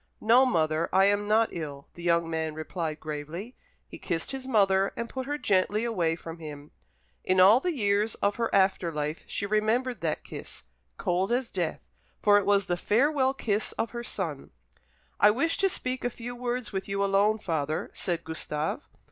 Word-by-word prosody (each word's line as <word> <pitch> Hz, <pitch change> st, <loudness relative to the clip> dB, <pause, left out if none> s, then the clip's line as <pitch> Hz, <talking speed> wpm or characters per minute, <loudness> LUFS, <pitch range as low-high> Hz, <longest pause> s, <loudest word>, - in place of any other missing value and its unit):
"No, 245 Hz, +4 st, +5 dB
mother, 160 Hz, -6 st, +1 dB
I 195 Hz, -, +5 dB
am 205 Hz, +1 st, +2 dB
not 220 Hz, +2 st, +3 dB
ill," 145 Hz, -4 st, -6 dB
the 175 Hz, -, -11 dB
young 170 Hz, -1 st, +2 dB
man 160 Hz, -1 st, -2 dB
replied 155 Hz, 0 st, -4 dB
gravely. 155 Hz, -, -6 dB, 0.3 s
He -, -, -11 dB
kissed 165 Hz, -3 st, -2 dB
his 265 Hz, -1 st, -6 dB
mother, 195 Hz, -5 st, +3 dB
and 235 Hz, -, -3 dB
put 260 Hz, +1 st, -5 dB
her 290 Hz, +1 st, -1 dB
gently 205 Hz, -3 st, +1 dB
away 175 Hz, -8 st, 0 dB
from 165 Hz, 0 st, -9 dB
him. 150 Hz, -2 st, -9 dB, 0.5 s
In 185 Hz, 0 st, +2 dB
all 200 Hz, +6 st, +8 dB
the 350 Hz, +3 st, -2 dB
years 205 Hz, -2 st, +1 dB
of 200 Hz, -, 0 dB
her 230 Hz, -1 st, 0 dB
after 190 Hz, -3 st, +2 dB
life 150 Hz, +1 st, -3 dB
she 200 Hz, -, -3 dB
remembered 220 Hz, +4 st, 0 dB
that 160 Hz, -2 st, -2 dB
kiss, -, -, -10 dB, 0.3 s
cold 185 Hz, +4 st, 0 dB
as 245 Hz, 0 st, 0 dB
death, 175 Hz, -4 st, -2 dB, 0.4 s
for 205 Hz, 0 st, +5 dB
it 200 Hz, -, -4 dB
was 200 Hz, -1 st, +4 dB
the 175 Hz, -, -1 dB
farewell 265 Hz, -, +2 dB
kiss 215 Hz, -4 st, -1 dB
of 225 Hz, -, -2 dB
her 235 Hz, 0 st, -5 dB
son. 165 Hz, -11 st, -4 dB, 0.7 s
"I 205 Hz, -, +7 dB
wish 280 Hz, +10 st, +1 dB
to 390 Hz, -, +3 dB
speak 255 Hz, -7 st, -3 dB
a 245 Hz, -, +1 dB
few 245 Hz, +1 st, -7 dB
words 245 Hz, -2 st, -3 dB
with 190 Hz, 0 st, -3 dB
you 200 Hz, 0 st, -1 dB
alone, 200 Hz, +2 st, +3 dB
father," 155 Hz, -6 st, -2 dB
said 170 Hz, -2 st, -2 dB
Gustave. 155 Hz, -1 st, -3 dB
200 Hz, 185 wpm, -28 LUFS, 165-235 Hz, 0.7 s, all